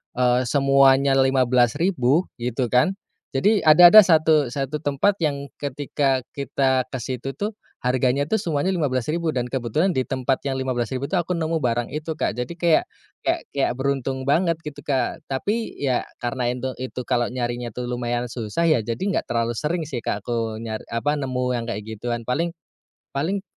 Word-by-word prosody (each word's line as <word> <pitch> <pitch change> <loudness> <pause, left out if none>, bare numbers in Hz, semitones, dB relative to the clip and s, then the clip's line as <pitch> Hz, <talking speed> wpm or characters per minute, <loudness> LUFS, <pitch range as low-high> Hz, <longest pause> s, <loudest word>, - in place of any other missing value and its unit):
eee, 125 0 +2
semuanya 135 0 +4
Rp15.000 130 - +2 0.2
gitu 120 0 -2
kan. 125 +10 +3 0.4
Jadi 205 +9 +3
ada 175 +3 +9
ada 215 - +12
satu 160 -5 +4
satu 135 +3 -3
tempat 145 +7 +2
yang 140 -3 -2
ketika 140 -1 -1
kita 135 -2 +1
ke 130 - -4
situ 130 +1 -4
tuh 205 +2 -2 0.3
harganya 130 +2 +1
tuh 220 - +1
semuanya 170 +1 0
Rp15.000 150 +2 -1
dan 125 -4 -1
kebetulan 135 - 0
di 130 - +2
tempat 130 +1 -1
yang 135 - -2
Rp15.000 130 0 -2
tuh 195 - -2
aku 175 - -6
nemu 160 0 -1
barang 120 -1 -1
itu 155 +2 -4
Kak. - - 0
Jadi 125 +8 -5
kayak, 170 -2 +2 0.3
kayak - - 0
kayak 140 -3 +1
beruntung 135 -1 -2
banget 165 +4 +2
gitu 150 -2 -7
Kak. 135 +4 -1
Tapi 205 - -2
ya 130 -3 0 0.2
karena 120 0 -2
intu 125 +1 -3
itu 125 -1 -5
kalo 120 0 +1
nyarinya 120 -1 -3
tuh 125 +3 -6
lumayan 120 0 -2
susah 120 +6 -2
ya 155 -8 +3
jadi 115 +1 -4
enggak 195 -2 -1
terlalu 115 0 0
sering 155 +7 -2
sih 130 -5 -5
Kak 105 -2 -3
aku 115 -2 -2
nyar, 110 -1 -5
apa 115 +6 0
nemu 130 -3 -2
yang 120 -1 -2
kayak 105 0 -4
gituan. 115 +2 -4
Paling 155 +8 0 0.6
paling 175 +8 -2
130 Hz, 170 wpm, -23 LUFS, 120-155 Hz, 0.6 s, ada